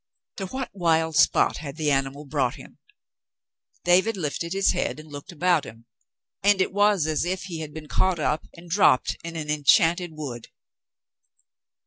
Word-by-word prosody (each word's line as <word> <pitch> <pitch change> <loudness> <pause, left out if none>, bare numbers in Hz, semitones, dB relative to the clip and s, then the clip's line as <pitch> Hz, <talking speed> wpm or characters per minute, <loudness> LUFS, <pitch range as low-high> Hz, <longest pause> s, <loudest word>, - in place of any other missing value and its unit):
To 195 - -4
what 260 +5 -5
wild 165 -4 +1
spot 150 - +3
had 145 -2 -7
the 155 -2 0
animal 135 +2 -1
brought 135 - -1
him? - - -14 1.0
David 190 +5 +3
lifted 170 0 -3
his 195 +1 +2
head - - -2
and 155 0 -13
looked 145 +6 -9
about 175 -2 +2
him, 115 +1 -12 0.6
and 205 0 +4
it 185 - 0
was 205 -4 +3
as 155 -1 0
if 180 +2 -2
he 170 -4 -6
had 155 -2 -6
been 155 0 -9
caught 185 +2 +1
up 155 0 -1
and 170 +1 -13
dropped 170 -7 +3
in 170 0 -7
an 150 -2 -3
enchanted 165 +4 +3
wood. 130 -7 -7
165 Hz, 165 wpm, -25 LUFS, 150-185 Hz, 1.0 s, and